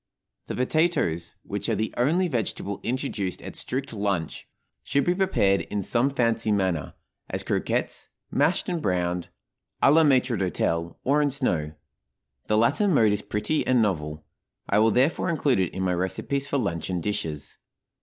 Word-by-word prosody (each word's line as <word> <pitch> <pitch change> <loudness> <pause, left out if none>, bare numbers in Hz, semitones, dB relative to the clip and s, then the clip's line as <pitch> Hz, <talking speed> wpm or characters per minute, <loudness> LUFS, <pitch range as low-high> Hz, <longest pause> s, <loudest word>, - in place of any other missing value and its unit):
The - - -4
potatoes, 130 - 0
which - - -4
are - - +2
the 110 +1 -2
only 165 +9 +2
vegetable 110 - -3
introduced 115 -7 -2
at - - -7
strict 135 0 -3
lunch, 100 -6 -2 0.4
should 140 - +1
be 175 - +3
prepared 180 - +2
in 105 -1 -3
some 120 +7 +2
fancy 115 -4 +1
manner, 95 -8 0 0.3
as - - -3
croquettes, - - -1 0.2
mashed 150 +6 +1
and 175 -3 -2
browned, 90 - -1 0.5
à 140 - +7
la 160 +1 +6
maître 130 -4 +3
d'hôtel, 85 -3 -1
or 145 +3 +3
in 145 - +2
snow. 85 - -1 0.7
The 105 - +2
latter 135 - +3
mode 115 - +4
is 105 0 0
pretty 105 +9 -1
and 130 -1 +4
novel; 75 -8 -1 0.4
I 100 - +3
will, 110 +1 +5
therefore, 135 - +2
include 145 -8 +2
it 90 -3 0
in 95 - -3
my 90 -1 +1
recipes 115 +10 -2
for 145 - 0
luncheon 90 - -2
dishes. 80 -6 -4
110 Hz, 160 wpm, -25 LUFS, 95-140 Hz, 0.7 s, à